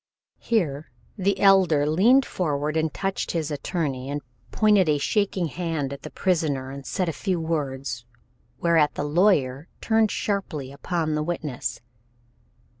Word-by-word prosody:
Here 160 -10 -1 0.3
the 195 -1 0
Elder 185 -7 +5
leaned 220 - +4
forward 150 -3 -2
and 160 -1 +1
touched 195 +4 -3
his 160 -2 -2
attorney, 140 -4 -3
and 145 0 -3 0.3
pointed 210 -6 +3
a 150 - +3
shaking 195 +3 0
hand 160 -3 -3
at 140 - -9
the - - -7
prisoner 150 -8 -1
and 140 -1 -8
said 185 -2 -1
a 165 - -1
few 185 0 -1
words, 140 -7 -3 0.6
whereat 165 -3 +3
the - - -2
lawyer 150 -3 +2
turned 220 -1 +2
sharply 160 -12 -3
upon 155 +2 -2
the 150 - 0
witness. 140 -7 -3
160 Hz, 140 wpm, -25 LUFS, 145-185 Hz, 0.6 s, Elder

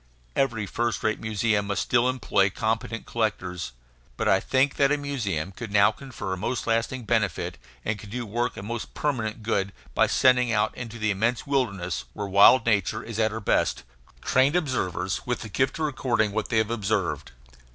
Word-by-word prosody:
Every 115 -6 +1
first 120 +3 -2
rate 110 -1 +1
museum 110 -1 0
must 100 - 0
still 120 +1 +3
employ 105 -6 +2
competent 110 +3 -2
collectors; 95 - -2 0.5
but - - -1
I 95 - +5
think 135 +6 +1
that 140 0 +4
a 150 - +3
museum 105 - -2
could 110 +2 -8
now 100 -1 +5
confer 115 -8 -6
most 115 +7 -2
lasting 115 +2 0
benefit, 110 -5 -1 0.3
and 110 0 -1
could 100 - -10
do 120 +2 -4
work 120 +3 -2
of 95 - -6
most 120 +1 -5
permanent 115 -6 -2
good, 100 -3 0 0.2
by - - +4
sending 125 -2 +4
out 105 -2 +1
into 120 -1 -7
the 105 -2 0
immense 115 +5 0
wildernesses, 100 - -1
where 105 - -4
wild 100 +6 +6
nature 110 -1 +1
is 115 -1 -6
at 110 -1 +3
her 110 +1 -5
best, 105 - +1 0.4
trained 135 +5 +3
observers 95 - -1
with 125 - -1
the 110 - -7
gift 130 +6 0
of 160 - 0
recording 120 -7 0
what 110 +1 -2
they 115 - +1
have 110 +1 +2
observed. 105 - -1
110 Hz, 185 wpm, -26 LUFS, 100-125 Hz, 0.5 s, wild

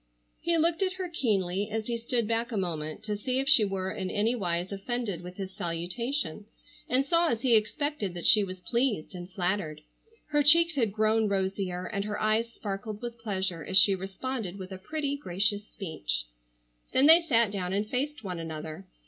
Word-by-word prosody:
He 340 0 +1
looked 330 +3 +2
at 375 -1 +1
her 370 -1 -4
keenly 205 - 0
as 220 0 -2
he 235 - -1
stood 235 -1 -1
back 230 +2 0
a 220 - -2
moment, 165 -1 -3
to 210 -1 -2
see 255 +5 -2
if 270 +1 0
she 275 -6 +7
were 190 -2 -1
in 190 -1 -3
any 215 +5 +1
wise 180 -5 -1
offended 200 -2 -3
with 180 +1 -9
his 190 -1 -5
salutation, 180 - -3 0.4
and 260 +2 +2
saw 335 +3 +3
as 230 -3 -1
he 245 -3 +5
expected 215 - 0
that 175 - -5
she 215 -3 +7
was 185 -1 -6
pleased 235 -4 0
and 175 0 -7
flattered. 180 -4 -2 0.5
Her 295 -1 +3
cheeks 335 +3 +6
had 235 -8 +1
grown 215 +1 +2
rosier, 190 -2 -1
and 200 +1 -2
her 210 0 -3
eyes 220 +2 +1
sparkled 205 0 -5
with 235 -1 -5
pleasure 190 -6 -2
as 190 - +2
she 195 - +7
responded 195 +2 -4
with 190 -1 -8
a 190 - -6
pretty, 285 +6 -2
gracious 205 -2 0
speech. 150 - -3 0.7
Then 265 - +5
they 325 +3 +9
sat 235 -10 +3
down 185 -3 -2
and 205 +2 0
faced 275 +3 -2
one 180 -4 -4
another. 155 -6 -6
210 Hz, 190 wpm, -29 LUFS, 185-245 Hz, 0.7 s, they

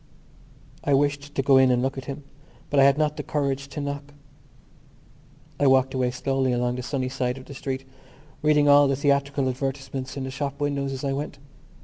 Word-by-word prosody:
I 140 - +3
wished 145 +1 0
to - - +2
go 135 0 +5
in 130 -1 +6
and 125 0 +2
look 135 - -1
at 135 -2 -7
him 140 +1 -6 0.5
but 145 - +3
I 135 - +7
had 140 0 +5
not 150 0 0
the - - -2
courage 140 -2 -2
to 145 +2 -7
knock. 145 0 -5 1.4
I 145 - +4
walked 130 0 +4
away 130 -1 +1
slowly 130 0 0
along 125 0 0
the - - -3
sunny 130 0 -2
side 130 -1 -2
of 130 - -11
the - - -10
street, 135 -1 -4 0.6
reading 150 -1 +4
all 145 0 +7
the 135 - +1
theatrical 140 -1 +1
advertisements 135 0 -4
in 135 - -3
the 130 - -4
shop 140 +1 -4
windows 140 -1 -1
as 135 0 -5
I 135 -1 0
went. 145 +2 -4
135 Hz, 205 wpm, -25 LUFS, 130-145 Hz, 1.4 s, I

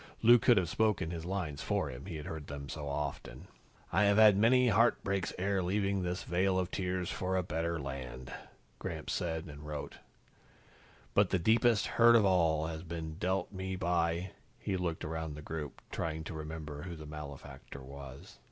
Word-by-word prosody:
Lou 120 +1 +8
could 120 0 +5
have 90 -3 +2
spoken 105 -3 +1
his 85 -1 -5
lines 90 -6 -3
for - - -1
him, 65 +8 -9
he 85 - -5
had 75 -1 -6
heard 80 -2 -6
them 70 0 -6
so 75 -2 -5
often. 70 0 -4 0.4
"I 100 +5 +4
have 100 0 +4
had 110 -2 +8
many 125 +4 +5
heartbreaks 100 -4 +2
ere 95 +1 +1
leaving 100 +1 0
this 90 -1 -2
vale 95 +2 +1
of 90 -1 -1
tears 90 -1 -2
for 95 0 -1
a 90 - +1
better 85 0 -2
land," 65 -2 -6 0.5
Gramps - - -4
said 80 -1 -2
and 70 -3 -10
wrote. 75 -1 -6 1.2
"But 100 -2 +4
the 95 - +2
deepest 110 +3 +3
hurt 120 0 +6
of 110 -3 +6
all 80 -5 +3
has 80 0 -4
been 80 -2 -6
dealt 95 +1 0
me 95 -1 -4
by 85 0 0
" - - -34
He 95 - -2
looked 85 -3 -2
around 80 -1 -4
the 75 - -9
group, 75 -2 -6
trying 80 -1 -3
to 80 - -6
remember 75 -1 -6
who 85 0 -6
the 80 -1 -9
malefactor 70 -2 -9
was. 70 0 -10
85 Hz, 185 wpm, -32 LUFS, 75-95 Hz, 1.2 s, Lou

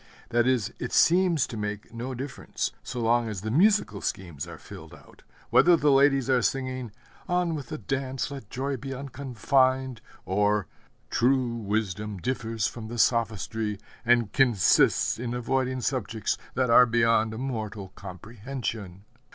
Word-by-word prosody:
That 120 +1 +2
is, 120 -5 +1
it 125 - -4
seems 175 -4 +4
to - - -8
make 105 +1 -5
no 125 +3 -5
difference, 135 +2 -4
so 125 - -6
long 115 0 +2
as 100 -4 -5
the 110 +1 -3
musical 205 - +3
schemes 85 -6 -4
are 85 - -9
filled - - -11
out, - - -19 0.3
whether 175 0 +6
the 150 -1 +3
ladies 135 -1 +4
are 130 -2 +3
singing, 130 -2 -2 0.4
'On 175 -2 +1
with 145 -5 -5
the - - -5
dance, 135 +4 -3
let 135 -7 -8
joy 135 +1 -3
be 135 +2 -6
unconfined!' 130 -1 0 0.2
or, 105 +2 +1 0.5
'True 125 -1 +2
wisdom 105 -2 -2
differs 115 0 -2
from 115 +3 -5
sophistry, 110 -2 0 0.3
and 120 -3 +2
consists 120 - +3
in 120 0 -3
avoiding 130 +1 -1
subjects 115 -5 -1 0.2
that 125 -2 +1
are 125 +1 +8
beyond 115 -1 +2
mortal 110 -6 -4
comprehension.' 100 0 -7
120 Hz, 145 wpm, -27 LUFS, 110-130 Hz, 0.5 s, are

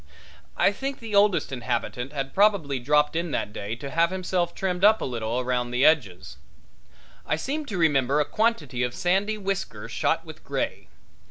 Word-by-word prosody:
I - - +4
think 270 +6 -4
the 225 -2 -8
oldest 200 -5 +3
inhabitant 125 +1 -3
had 135 -2 -4
probably 195 -10 +2
dropped 150 +4 +2
in 170 +1 -1
that 105 - -2
day 105 +1 -4
to 140 +3 -7
have 170 +1 +3
himself 185 -1 -1
trimmed 185 -1 -2
up 215 +1 +6
a - - -3
little 120 0 -2
round 125 -1 -1
the 125 +3 +2
edges. 90 - +1 0.9
I - - 0
seem 285 - -3
to 200 - -4
remember 145 -4 +2
a 150 - +2
quantity 175 - 0
of 125 -1 -1
sandy 195 +4 +1
whiskers 195 -1 -4
shot - - 0
with - - -11
gray. - - -3
155 Hz, 175 wpm, -25 LUFS, 125-195 Hz, 0.9 s, up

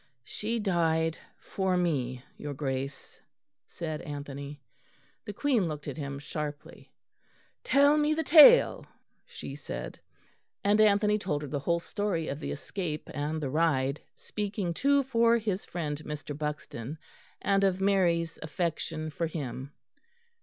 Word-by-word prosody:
"She 225 - -3
died 165 -5 +1 0.2
for 190 -2 -1
me, 130 -8 -1
your 145 -1 -6
Grace," 135 0 -4 0.5
said 155 -3 -5
Anthony. 145 0 -7 0.7
The 205 - -4
Queen 240 - +1
looked 150 -2 -5
at 140 - -4
him 140 -2 -4
sharply. 145 +1 -6 0.7
"Tell 285 +2 +5
me 300 +1 +2
the 320 - 0
tale," 340 +12 +8 0.4
she - - -8
said. - - -6 0.6
And 205 +2 +4
Anthony 210 0 +4
told 150 -7 -2
her - - -4
the 140 +1 -2
whole 170 +5 +1
story 175 -3 -2
of 140 - -4
the - - -5
escape 155 0 -4
and 150 +2 -2
the 140 -4 -3
ride; 145 -3 +1
speaking 200 -4 -3
too 280 +8 +3
for 235 -2 +3
his 210 -4 -2
friend, 155 -4 -4
Mr. 150 -1 -6
Buxton, 150 -2 -5 0.4
and 195 0 +2
of 190 -1 +2
Mary's 175 -4 +2
affection 160 -1 -3
for 165 +2 -2
him. 135 -4 -5
165 Hz, 135 wpm, -29 LUFS, 145-200 Hz, 0.7 s, tale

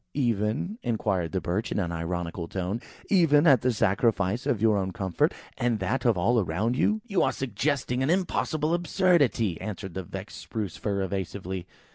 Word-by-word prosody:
"Even," 120 - 0
inquired 100 -7 -1
the 95 - 0
Birch, 90 +6 -2
in - - -1
an 90 -4 -1
ironical 85 0 -3
tone; 95 +6 -3 0.3
"even 165 -6 +5
at 135 -8 +6
the 125 - +2
sacrifice 105 0 +1
of 110 - +1
your 110 0 +4
own 95 -2 0
comfort, 95 -2 0 0.3
and 120 -2 +1
that 115 +7 -1
of 115 -5 +4
all 115 +7 +3
around 105 +6 0
you?" 215 +10 +2
"You 200 -7 +1
are - - +3
suggesting 130 +1 -1
an 135 - +1
impossible 165 -3 0
absurdity," 170 - +2
answered 100 -3 -5
the 95 - -3
vexed 95 +3 -8
Spruce 105 -7 -4
fir, 100 -2 -1
evasively. 95 -1 -4
105 Hz, 170 wpm, -27 LUFS, 95-130 Hz, 0.3 s, at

